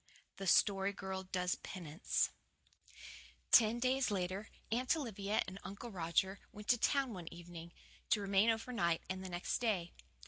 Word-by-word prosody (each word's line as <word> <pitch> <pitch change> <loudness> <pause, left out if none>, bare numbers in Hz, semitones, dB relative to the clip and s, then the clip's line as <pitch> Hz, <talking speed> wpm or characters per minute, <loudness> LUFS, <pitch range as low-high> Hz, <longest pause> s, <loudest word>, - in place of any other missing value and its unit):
THE 195 - -4
STORY 195 +1 +4
GIRL 190 -1 -5
DOES 180 -1 -1
PENANCE 170 -1 -1 1.2
Ten 225 0 +7
days 255 +1 +2
later, 190 +1 -2 0.2
Aunt 250 +6 +2
Olivia 210 -7 -1
and 185 +1 -7
Uncle 200 +5 -7
Roger 190 +2 0
went 210 0 -10
to 245 - +5
town 275 -3 +2
one 175 -4 -7
evening, 170 -1 -9 0.4
to 215 - +4
remain 200 +2 +3
over 225 +3 0
night, 170 -7 +1
and 190 0 -4
the 190 - -5
next 175 0 -2
day. 200 -8 0
195 Hz, 150 wpm, -36 LUFS, 180-225 Hz, 1.2 s, Ten